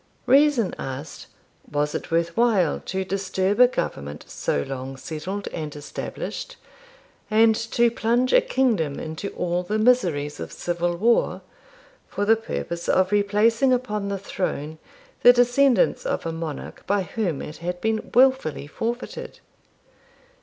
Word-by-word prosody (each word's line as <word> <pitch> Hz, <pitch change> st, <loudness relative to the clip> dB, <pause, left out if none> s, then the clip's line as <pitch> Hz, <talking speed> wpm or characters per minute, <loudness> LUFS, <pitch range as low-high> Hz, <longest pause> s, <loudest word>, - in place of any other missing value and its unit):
Reason 270 Hz, -6 st, +4 dB
asked, 135 Hz, +4 st, -7 dB, 0.4 s
was 150 Hz, 0 st, 0 dB
it -, -, -4 dB
worth 170 Hz, 0 st, 0 dB
while 215 Hz, -9 st, +2 dB
to 190 Hz, +1 st, -1 dB
disturb 190 Hz, +1 st, -1 dB
a 250 Hz, -, +9 dB
government 75 Hz, -, -4 dB
so 70 Hz, -, -1 dB
long 135 Hz, -, -6 dB
settled 180 Hz, +8 st, -5 dB
and 155 Hz, -3 st, -6 dB
established, 145 Hz, -1 st, -6 dB, 0.7 s
and 220 Hz, +1 st, +5 dB
to 230 Hz, +1 st, +1 dB
plunge 240 Hz, +3 st, +1 dB
a -, -, +7 dB
kingdom 235 Hz, -, 0 dB
into 160 Hz, +5 st, -5 dB
all 175 Hz, 0 st, -1 dB
the 210 Hz, +4 st, -2 dB
miseries 175 Hz, -12 st, +2 dB
of -, -, -6 dB
civil 175 Hz, 0 st, -2 dB
war, 230 Hz, +5 st, +2 dB, 0.7 s
for 205 Hz, -, -2 dB
the 225 Hz, +2 st, +5 dB
purpose 170 Hz, -6 st, -5 dB
of 185 Hz, +1 st, +3 dB
replacing 210 Hz, +5 st, +3 dB
upon 210 Hz, -5 st, -1 dB
the 200 Hz, -, -2 dB
throne 160 Hz, -5 st, -4 dB, 0.4 s
the 245 Hz, -, +9 dB
descendants 250 Hz, -, +3 dB
of -, -, -2 dB
a 165 Hz, -, -1 dB
monarch 165 Hz, -3 st, -6 dB
by 200 Hz, -1 st, +1 dB
whom 180 Hz, -6 st, -2 dB
it 150 Hz, -, -7 dB
had 175 Hz, +1 st, -4 dB
been 220 Hz, +2 st, -1 dB
wilfully 260 Hz, -, +3 dB
forfeited? 230 Hz, +10 st, -5 dB
200 Hz, 140 wpm, -24 LUFS, 165-235 Hz, 0.7 s, a